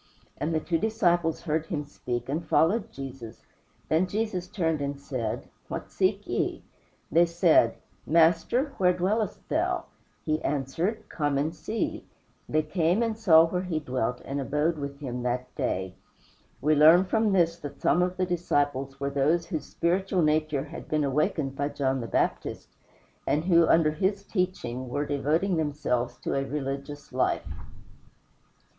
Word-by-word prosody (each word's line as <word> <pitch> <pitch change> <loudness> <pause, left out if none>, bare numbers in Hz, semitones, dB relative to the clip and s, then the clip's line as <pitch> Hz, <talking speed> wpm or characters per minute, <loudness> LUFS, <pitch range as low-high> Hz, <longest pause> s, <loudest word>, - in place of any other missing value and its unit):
And 160 - -1
the 160 - +1
two 165 +1 -1
disciples 175 -6 +1
heard 160 -1 -1
him 150 -2 -3
speak 120 -4 -4
and 150 +5 -2
followed 180 +7 +2
Jesus. 130 -4 -9 0.4
Then 165 +4 +2
Jesus 200 -3 -2
turned 165 -6 -1
and 140 0 -3
said, 130 -4 -4 0.2
"What - - -6
seek - - +1
ye?" - - -2 0.5
They 170 +3 +5
said, 170 -8 +4 0.3
"Master, 170 - +3
where 180 -1 +4
dwellest 195 +4 -1
thou?" 355 +3 0 0.4
He 155 0 0
answered, 165 - -2
"Come 145 -3 -1
and 155 +4 -1
see." 190 +9 -3 0.5
They 155 0 +2
came 170 +6 +1
and 225 -1 -1
saw 165 -7 +6
where 180 +2 -2
he 180 -4 -2
dwelt, 125 -4 -2
and 140 +1 -3
abode 150 +4 0
with 140 0 -5
him 125 -4 -4
that 125 +1 -2
day. 95 0 -2 0.7
We 155 +2 +3
learn 160 +5 +7
from 220 +2 +1
this 170 -3 +2
that 145 -3 -8
some 175 - +3
of 180 +1 0
the 185 - +1
disciples 145 -6 -1
were 140 0 -2
those 150 +5 +2
whose 165 -3 -4
spiritual 185 +1 0
nature 155 -2 +1
had 150 - -9
been 155 -1 +1
awakened 140 0 0
by 145 +1 -1
John 135 -2 -1
the 115 - -5
Baptist, - - -1 0.6
and 155 +3 +1
who, 170 -2 +5
under 160 -2 +4
his 195 +5 -1
teaching, 155 - -2
were 145 +4 -1
devoting 155 +6 0
themselves 145 -6 -1
to - - -2
a 135 - 0
religious 140 +1 -5
life. - - +1
155 Hz, 155 wpm, -27 LUFS, 140-180 Hz, 0.7 s, learn